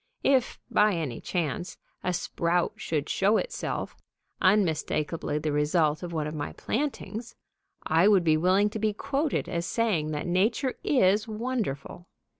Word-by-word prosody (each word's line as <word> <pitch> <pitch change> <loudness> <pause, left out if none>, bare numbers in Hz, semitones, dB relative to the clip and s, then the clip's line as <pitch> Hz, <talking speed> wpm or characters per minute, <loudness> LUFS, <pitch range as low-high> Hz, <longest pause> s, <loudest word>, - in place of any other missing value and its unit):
If, 265 -3 +2
by 210 -2 +4
any 150 -8 -3
chance, 175 0 -3 0.3
a 180 - 0
sprout 170 0 0
should 150 -2 -2
show 205 +3 +3
itself, - - -3 0.5
unmistakably 165 -5 +1
the 150 0 -1
result 150 +1 +2
of 175 -1 -5
one 155 -2 -1
of 150 - -4
my 145 -2 -4
plantings, 240 -3 -3 0.5
I 165 +5 +4
would 200 -4 +5
be 160 -2 +4
willing 185 +6 +3
to 220 - -4
be 215 0 +1
quoted 280 +6 -1
as 170 0 -2
saying 205 -10 0
that 150 -1 -3
Nature 215 +9 +1
is 210 -4 +3
wonderful. 215 - -4
180 Hz, 145 wpm, -27 LUFS, 155-220 Hz, 0.5 s, would